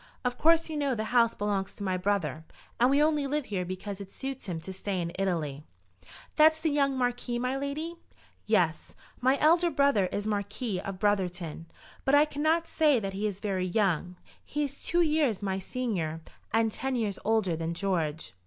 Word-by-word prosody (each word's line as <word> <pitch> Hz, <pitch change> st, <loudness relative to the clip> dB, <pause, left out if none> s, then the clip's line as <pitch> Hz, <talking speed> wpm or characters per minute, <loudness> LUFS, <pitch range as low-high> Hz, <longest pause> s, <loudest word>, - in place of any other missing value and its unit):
Of 250 Hz, 0 st, 0 dB
course 330 Hz, +1 st, +4 dB
you 315 Hz, -, -5 dB
know 280 Hz, -3 st, +1 dB
the 215 Hz, -, -2 dB
house 230 Hz, -2 st, +4 dB
belongs 200 Hz, -2 st, -2 dB
to 205 Hz, -, -7 dB
my 190 Hz, -2 st, 0 dB
brother, 180 Hz, -4 st, -1 dB, 0.4 s
and 245 Hz, +2 st, +5 dB
we 285 Hz, +2 st, +4 dB
only 300 Hz, -2 st, +2 dB
live 295 Hz, 0 st, -1 dB
here 190 Hz, -3 st, -2 dB
because 185 Hz, +2 st, -5 dB
it 195 Hz, -, -9 dB
suits 265 Hz, -3 st, -6 dB
him 170 Hz, -3 st, -3 dB
to 190 Hz, -, -7 dB
stay 190 Hz, 0 st, -3 dB
in 170 Hz, -1 st, -2 dB
Italy." 160 Hz, -7 st, -2 dB, 0.7 s
"That's 315 Hz, +1 st, +6 dB
the 315 Hz, -1 st, 0 dB
young 275 Hz, -2 st, +2 dB
Marquis, 245 Hz, -1 st, -1 dB
my 250 Hz, +2 st, -1 dB
lady?" 295 Hz, +5 st, -4 dB, 0.5 s
"Yes; -, -, +1 dB, 0.2 s
my 260 Hz, +2 st, +3 dB
elder 335 Hz, +4 st, +4 dB
brother 280 Hz, -, +3 dB
is 205 Hz, +3 st, -3 dB
Marquis 205 Hz, 0 st, -2 dB
of 195 Hz, -1 st, -5 dB
Brotherton, 180 Hz, -5 st, -1 dB, 0.4 s
but 270 Hz, -, +4 dB
I 295 Hz, +1 st, +6 dB
cannot 310 Hz, +3 st, +1 dB
say 300 Hz, -5 st, +3 dB
that 195 Hz, -2 st, -4 dB
he 205 Hz, +2 st, -1 dB
is 200 Hz, -1 st, -5 dB
very 190 Hz, -3 st, -1 dB
young. 180 Hz, -2 st, 0 dB, 0.3 s
He 295 Hz, 0 st, -2 dB
is 280 Hz, -1 st, -5 dB
two 345 Hz, +1 st, +2 dB
years 300 Hz, -, +1 dB
my 190 Hz, -1 st, -1 dB
senior, 185 Hz, -8 st, -3 dB, 0.3 s
and 225 Hz, 0 st, +2 dB
ten 265 Hz, +4 st, -2 dB
years 215 Hz, -5 st, -1 dB
older 210 Hz, -5 st, +2 dB
than 165 Hz, +1 st, -3 dB
George." 165 Hz, -, -2 dB
215 Hz, 190 wpm, -29 LUFS, 190-280 Hz, 0.7 s, That's